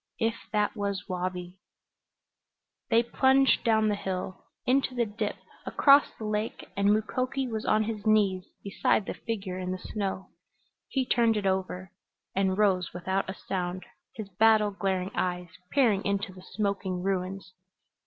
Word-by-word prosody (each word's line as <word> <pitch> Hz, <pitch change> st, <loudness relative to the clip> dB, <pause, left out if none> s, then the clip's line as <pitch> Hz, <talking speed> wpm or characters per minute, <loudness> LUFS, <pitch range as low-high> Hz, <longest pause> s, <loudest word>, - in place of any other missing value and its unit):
If 225 Hz, 0 st, +1 dB, 0.2 s
it 210 Hz, +1 st, +1 dB
was 200 Hz, -3 st, -3 dB
Wabi 180 Hz, -1 st, -4 dB, 1.3 s
They 230 Hz, +1 st, +4 dB
plunged 265 Hz, +3 st, +3 dB
down 220 Hz, -2 st, +3 dB
the 210 Hz, -, +2 dB
hill, 185 Hz, -2 st, -5 dB, 0.2 s
into 260 Hz, 0 st, +2 dB
the 240 Hz, -1 st, +2 dB
dip, 210 Hz, 0 st, -3 dB, 0.3 s
across 285 Hz, 0 st, +5 dB
the 220 Hz, -, -6 dB
lake, 215 Hz, +1 st, -3 dB
and 200 Hz, 0 st, +2 dB
Mukoki 255 Hz, +5 st, 0 dB
was 220 Hz, -2 st, -4 dB
on 215 Hz, 0 st, +3 dB
his 215 Hz, -1 st, -4 dB
knees 200 Hz, -4 st, +3 dB, 0.2 s
beside 200 Hz, +1 st, +1 dB
the -, -, -3 dB
figure 195 Hz, -5 st, -4 dB
in 180 Hz, 0 st, -4 dB
the 185 Hz, -, -2 dB
snow. 190 Hz, -1 st, -4 dB, 0.6 s
He 265 Hz, -2 st, 0 dB
turned 230 Hz, -3 st, +3 dB
it 205 Hz, -, -2 dB
over 190 Hz, 0 st, -1 dB, 0.4 s
and 190 Hz, -1 st, +1 dB
rose 190 Hz, -5 st, +2 dB
without 190 Hz, +2 st, -1 dB
a 190 Hz, -, -4 dB
sound, 180 Hz, 0 st, -4 dB, 0.3 s
his 215 Hz, -3 st, -6 dB
battle 215 Hz, +2 st, +4 dB
glaring 190 Hz, -1 st, -1 dB
eyes 180 Hz, -1 st, -2 dB, 0.2 s
peering 225 Hz, -8 st, +3 dB
into 200 Hz, 0 st, -1 dB
the 185 Hz, -, -12 dB
smoking 195 Hz, -2 st, -2 dB
ruins. 190 Hz, 0 st, -2 dB
200 Hz, 150 wpm, -28 LUFS, 185-220 Hz, 1.3 s, across